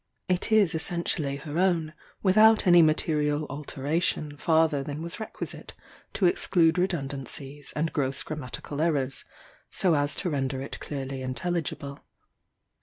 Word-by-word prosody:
It 180 +4 0
is 210 -6 +4
essentially 160 -3 -1
her 150 +3 -4
own, 170 -4 +1 0.3
without 215 +3 +5
any 175 -2 +7
material 155 -1 +2
alteration 150 +1 -2
farther 160 -1 +2
than 145 +2 -5
was 170 +5 -6
requisite 220 - -7 0.4
to 195 - +1
exclude 175 -1 +3
redundancies 140 -4 -3
and 160 +2 -1
gross 135 -2 0
grammatical 150 0 -5
errors, 140 -5 0 0.4
so 180 -3 +2
as 145 -1 +2
to 180 - -2
render 135 -2 -1
it 135 - -6
clearly 135 -2 -5
intelligible. 140 +1 -3
155 Hz, 125 wpm, -27 LUFS, 140-175 Hz, 0.4 s, any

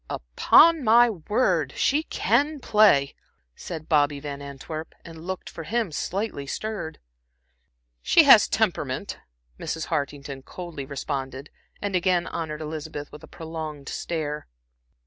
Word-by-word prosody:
"Upon 290 - +4
my 235 +1 +6
word 210 +7 0
she 290 +3 +2
can 290 - 0
play," 210 - +4 0.4
said 160 -3 -7
Bobby 145 -2 +2
Van 140 0 -6
Antwerp, 140 +3 -7
and 165 0 -11
looked, 185 -1 -5
for - - -8
him, 220 +1 -1
slightly 185 -3 -3
stirred. 210 -3 -4 1.0
"She - - +6
has - - +8
temperament," - - -1 0.4
Mrs. 160 -1 -4
Hartington 140 -2 -3
coldly 160 -2 -8
responded 135 0 -5 0.3
and 200 -2 -1
again 180 -1 +2
honored 155 -2 -5
Elizabeth 155 -1 -6
with 150 - -11
a - - -11
prolonged 160 -3 -7
stare. 150 -3 -4
160 Hz, 125 wpm, -25 LUFS, 145-200 Hz, 1.0 s, has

